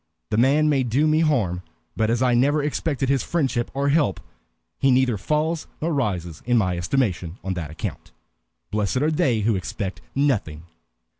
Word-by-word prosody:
"The 105 - +1
man 140 +6 +4
may 145 -3 +3
do 130 +5 +1
me 155 0 +3
harm, 115 - +1 0.3
but 110 0 +1
as 120 +2 +1
I 125 -1 +3
never 145 +5 +3
expected 145 -2 -1
his 135 -1 +2
friendship 135 -8 -1
or 140 +1 +1
help, 145 - +2 0.6
he 135 - +3
neither 130 -2 +3
falls 155 - -1
nor 165 +1 -1
rises 90 - -2
in 120 0 +2
my 95 -5 +1
estimation 90 -3 -1
on 95 - -2
that 85 -5 -5
account. 80 - -6 0.6
Blessed 105 +2 0
are 155 - +2
they 125 -7 +1
who 110 +1 +2
expect 95 +1 -4
nothing!" 105 - 0
125 Hz, 170 wpm, -23 LUFS, 100-145 Hz, 0.6 s, man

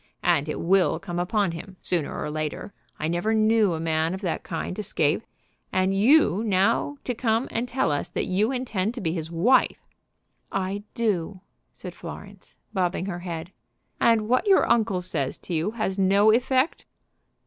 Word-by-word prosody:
And 145 +2 +2
it - - -3
will 185 +2 +3
come 175 -3 -5
upon 195 +1 +1
him 185 +3 -9
sooner 170 -5 -2
or 150 - -3
later. 155 +5 -4 0.2
I 155 - -2
never 175 +7 0
knew 215 -3 +3
a - - -4
man 160 +1 0
of 190 - -8
that 180 -5 -2
kind 175 +3 -5
escape. 160 -6 0 0.5
And 185 +1 +1
you 220 - +4
now 220 +7 +1
to 250 - -2
come 230 +1 0
and 235 +2 -2
tell 245 - 0
us 145 - -2
that - - -2
you 205 +6 +1
intend 235 -4 -2
to - - -5
be 165 -6 -1
his 160 -2 -4
wife!" 205 +11 +3 0.7
"I 195 +1 -2
do," 205 -5 -1 0.3
said - - -9
Florence, - - -11 0.2
bobbing 180 -2 0
her 185 -3 -4
head. 170 -1 -6 0.5
"And 225 -2 +3
what 255 - +2
your 390 - +5
uncle 215 -5 +2
says 140 -7 -3
to 180 - -7
you 165 +4 0
has 200 -3 -1
no 200 +3 +5
effect?" 255 +5 +1
195 Hz, 170 wpm, -25 LUFS, 170-225 Hz, 0.7 s, your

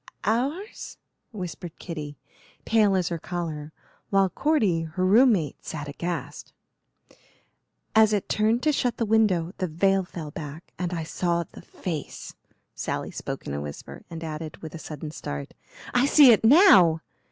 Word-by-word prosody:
"Ours?" 275 - -2 0.3
whispered 180 -5 -7
Kitty, 150 -4 -7 0.5
pale 210 -3 +3
as 180 -3 +1
her 170 -1 -3
collar, 160 -3 -5 0.4
while 195 -2 +3
Cordy, 215 - +1
her 165 +3 -2
room 235 +6 +6
mate, 155 -8 -3
sat 145 -2 -6
aghast. 150 -1 -5 1.4
"As 220 -1 +6
it 205 -2 0
turned 220 +3 +1
to 310 - +4
shut 250 -4 0
the 230 - 0
window 200 -6 +2
the 185 - 0
veil 195 +4 +2
fell 165 -4 -8
back 150 +2 -9
and 180 -1 -2
I 165 -2 -3
saw 170 +1 -1
the - - -14
face." 160 -6 -6 0.4
Sally - - -4
spoke - - -6
in - - -4
a 70 - -3
whisper 75 0 -8
and 165 0 -7
added, 155 -1 -6
with 160 - -7
a 165 - -7
sudden 155 -1 -7
start, 70 - -6 0.4
"I 245 +3 +3
see 285 -3 +8
it 220 - +4
now!" 220 - +7
175 Hz, 155 wpm, -25 LUFS, 160-220 Hz, 1.4 s, see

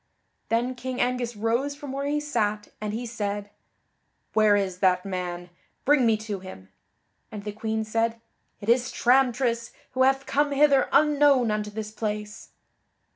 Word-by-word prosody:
Then 240 +3 +1
King 255 0 -5
Angus 245 -1 0
rose 235 +7 0
from 285 -2 -8
where 275 +1 -3
he 295 +1 +1
sat, 215 -8 -1
and 210 -1 -2
he 230 +3 -4
said: 205 -3 -4 0.8
"Where 215 -1 +5
is 190 -3 -1
that 185 -1 +2
man? 180 -2 -4 0.3
Bring 275 -4 +4
me 220 -1 +3
to 205 -3 -3
him." 140 - -11 0.6
And 210 -2 -7
the 210 - -4
Queen 220 +1 -2
said: 225 +1 -1 0.4
"It 200 - -8
is 240 +1 +3
Tramtris, 245 -2 +2 0.2
who 260 - -1
hath 270 +1 +3
come 290 +1 +1
hither 280 -1 +4
unknown 290 -6 +4
unto 210 0 -2
this 215 0 -6
place." 210 -1 -5
230 Hz, 155 wpm, -26 LUFS, 210-260 Hz, 0.8 s, Where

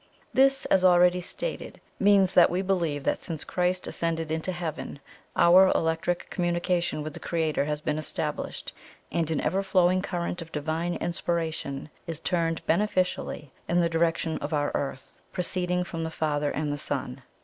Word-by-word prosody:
This, 270 +1 +4
as 190 - +3
already 180 0 +5
stated, - - -5 0.2
means 195 -2 +4
that 175 - +7
we 180 +2 -1
believe 170 -7 0
that - - 0
since 160 -4 -5
Christ 180 0 0
ascended 165 -1 -2
into 160 +3 0
Heaven, 170 -5 -5 0.4
our 185 +2 +7
electric 165 +2 0
communication 175 -2 0
with 155 0 -6
the - - -8
Creator 160 -4 0
has 150 0 -2
been 150 0 -1
established, 155 - -4 0.4
and 165 -1 0
an 160 - 0
ever 185 +6 +1
flowing 185 -1 +3
current 175 -2 -3
of 165 0 -9
divine 160 +3 -2
inspiration 160 -4 -3 0.2
is 165 -2 -4
turned 165 -1 -1
beneficially 180 -5 0 0.2
in 175 - +3
the 170 -1 +2
direction 165 -1 0
of 145 +2 -4
our 145 0 0
Earth, 135 -1 -4
'proceeding 180 0 0
from 165 -2 -5
the 160 - -2
Father 150 -2 -1
and 150 -1 -2
the 145 - -4
Son.' 135 -2 -3
170 Hz, 160 wpm, -27 LUFS, 155-180 Hz, 0.4 s, that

